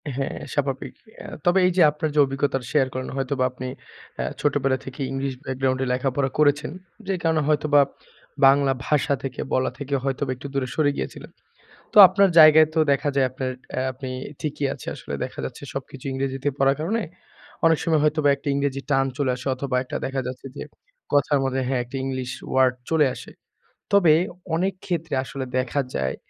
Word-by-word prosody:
হ্যাঁ 135 0 -3
স্বাভাবিক। 135 -2 -2 0.3
এ - - -10 0.2
তবে 175 +2 +4
এই - - +2
যে - - +5
আপনার 150 +1 -3
যে - - +3
অভিজ্ঞতাটা 135 -2 -2
শেয়ার 140 -4 +3
করেন 130 0 -4
হয়তোবা 135 0 -1
আপনি 130 0 -7 0.5
এ - - -1 0.2
ছোটবেলা 135 -2 +1
থেকেই 135 +1 -5
ইংলিশ 135 0 -2
ব্যাকগ্রাউন্ডে 130 0 -1
লেখাপড়া 135 +1 0
করেছেন, 145 -1 +3 0.4
যে 195 - 0
কারণে 160 -1 +2
হয়তোবা 150 -1 +4 0.7
বাংলা 140 0 +4 0.2
ভাষা 145 -1 +2
থেকে 135 -2 -4
বলা 130 - +1
থেকে 140 0 -5
হয়তোবা 135 0 -1
একটু 130 +3 -8
দূরে 135 -2 -1
সরে 150 -2 +3
গিয়েছিলেন। - - -6 0.6
তো - - +1
আপনার 195 +2 +3
জায়গায় 155 0 +8
তো - - +3
দেখা 140 +1 +1
যায় 135 -2 +3
আপনার 130 0 -3 0.4
আপনি 130 0 -7 0.3
ঠিকই 150 -1 -2
আছে - - -12
আসলে - - -8
দেখা - - -10
যাচ্ছে - - -8
সবকিছু 135 0 -7
ইংরেজিতে 135 +1 -2
পড়ার 135 0 +3
কারণে 205 +9 -1 0.6
অনেক 165 -1 +5
সময় 160 -2 +2
হয়তোবা 150 -1 +2
একটা 140 +2 -12
ইংরেজি 140 -1 -1
টান 135 -1 +3
চলে 140 -3 +1
আসে 125 +2 -7
অথবা 130 0 -3
একটা 125 - -8
দেখা 135 0 -2
যাচ্ছে 130 +1 -7
যে - - -5 0.5
কথার 145 0 +3
মধ্যে 135 0 -1
হ্যাঁ 130 -1 0
একটা 125 +3 -7
ইংলিশ 130 -2 -3 0.2
ওয়ার্ড 130 -1 +4 0.2
চলে 160 -2 +4
আসে। - - -10 0.6
তবে 185 -6 +6 0.4
অনেক 185 +4 0
ক্ষেত্রে 165 -4 -2
আসলে 135 0 -5
দেখা 130 +2 0
যায় 65 -1 -1
140 Hz, 175 wpm, -23 LUFS, 130-150 Hz, 0.7 s, জায়গায়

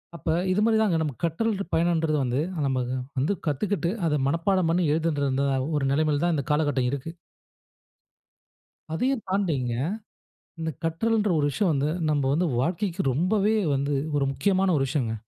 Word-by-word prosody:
அப்ப 170 - -11 0.2
இது 195 - +1
மாரிதாங்க 220 -6 +3
நமக்கு 150 -1 -4
கற்றல் 200 +4 -1
பயணம்ன்றது 160 -2 +2
வந்து 125 +3 0 0.3
நமக்கு 130 -1 -1 0.2
வந்து 155 +10 +1
கத்துக்கிட்டு, 175 +4 0 0.2
அத 150 - +1
மனப்பாடம் 170 +3 +1
பண்ணி 175 +1 +2
எழுதணுன்றதாவும் 140 -3 0
1 135 - 0
நிலைமையில 150 0 +1
தான் 170 -2 +2
இந்த 140 - -1
காலகட்டம் 145 -4 +1
இருக்கு. 140 +4 -4 1.8
அதையும் 250 +7 0
தாண்டிங்க, 160 -11 0 0.9
இந்த 160 0 -2
கற்றல்ன்ற 210 +6 +1
ஒரு 145 - +2
விஷயம் 180 +5 +1
வந்து, 145 +1 0 0.2
நம்ப 145 -2 +1
வந்து 175 +3 +1
வாழ்க்கைக்கு 180 +4 -1
ரொம்பவே 200 - +2 0.2
வந்து, 140 +1 0 0.2
ஒரு 140 -1 +2
முக்கியமான 190 +4 +1
ஒரு 135 - +1
விஷயங்க. 120 -7 -1
160 Hz, 140 wpm, -25 LUFS, 140-190 Hz, 1.8 s, மாரிதாங்க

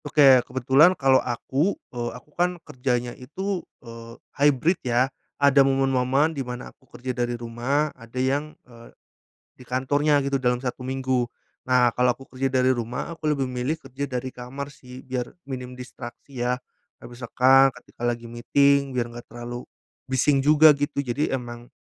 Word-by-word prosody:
Oke, 140 -3 +6
kebetulan 135 +8 +4
kalau 135 -2 +4
aku, 135 +9 -1 0.2
eee, 120 -1 -3
aku 150 +4 -19
kan 180 +1 0
kerjanya 125 -1 -2
itu, 185 +8 -4 0.2
eee, 115 0 -10 0.2
hybrid 145 +4 +2
ya, 125 +2 +1 0.2
ada 140 0 +5
momen-momen 135 +2 +2
di 140 - -3
mana 125 -1 -7
aku 130 - -31
kerja 130 +1 -5
dari 120 -1 -2
rumah, 120 +6 -1
ada 115 0 -13
yang, 140 +4 -1
eee, 115 -1 -15 0.7
di - - -15
kantornya 145 +4 +1
gitu, 135 -1 -1
dalam 125 -1 +2
1 125 0 -5
minggu. 130 -2 -1 0.3
Nah, 125 -2 +3
kalau 125 0 +3
aku 130 +2 -5
kerja 135 +1 -2
dari 130 0 +3
rumah, 120 0 -4
aku 155 -2 -2
lebih 135 -2 -1
milih 125 +5 -2
kerja 135 -1 -6
dari 130 0 -4
kamar 130 +3 -6
sih, 125 -2 -12
biar 125 -1 -3 0.2
minim 125 -2 -7
distraksi 125 +1 -8
ya, 125 +1 0 0.4
atau - - -12
misalkan 130 +3 +4
ketika - - -16
lagi 120 -1 -1
meeting 140 +4 +2
biar 120 -2 0
enggak 120 - -9
terlalu 120 +1 -7 0.5
bising 135 +2 +3
juga 150 +1 +7
gitu, 140 -1 -2
jadi 135 +2 0
emang 120 -1 -10
130 Hz, 160 wpm, -24 LUFS, 125-140 Hz, 0.7 s, juga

